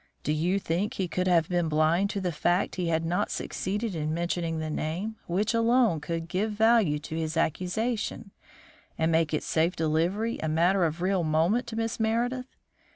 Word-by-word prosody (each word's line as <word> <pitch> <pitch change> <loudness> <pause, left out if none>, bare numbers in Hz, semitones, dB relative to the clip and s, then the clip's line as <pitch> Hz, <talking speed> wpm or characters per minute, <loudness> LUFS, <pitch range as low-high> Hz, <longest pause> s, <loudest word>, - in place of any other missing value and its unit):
Do 150 - 0
you 175 +5 +1
think 190 +2 -1
he 190 - -1
could 180 +2 -1
have 170 -3 +3
been 175 -2 0
blind 160 +6 +2
to 200 - -2
the 180 -2 -1
fact 175 +3 +1
that 185 - -3
he 175 - -1
had 165 0 0
not 180 +5 0
succeeded 205 +3 -3
in 155 -1 -2
mentioning 170 -1 -1
the 155 -1 -3
name 180 +9 -3
which 200 +6 0
alone 230 - +3
could 165 +1 -4
give 205 +5 -1
value 220 -7 +4
to 155 +2 -7
his 160 0 -2
accusation, 200 +6 -1 0.7
and 160 +1 +1
make 160 -1 +2
its 155 - -1
safe 165 +3 +1
delivery 170 +9 0
a 160 - -2
matter 175 +4 +3
of 165 +2 -2
real 190 -1 +1
moment 165 +10 +1
to 225 - -6
Miss 225 +1 -2
Meredith? 240 +3 0
175 Hz, 190 wpm, -27 LUFS, 160-210 Hz, 0.7 s, value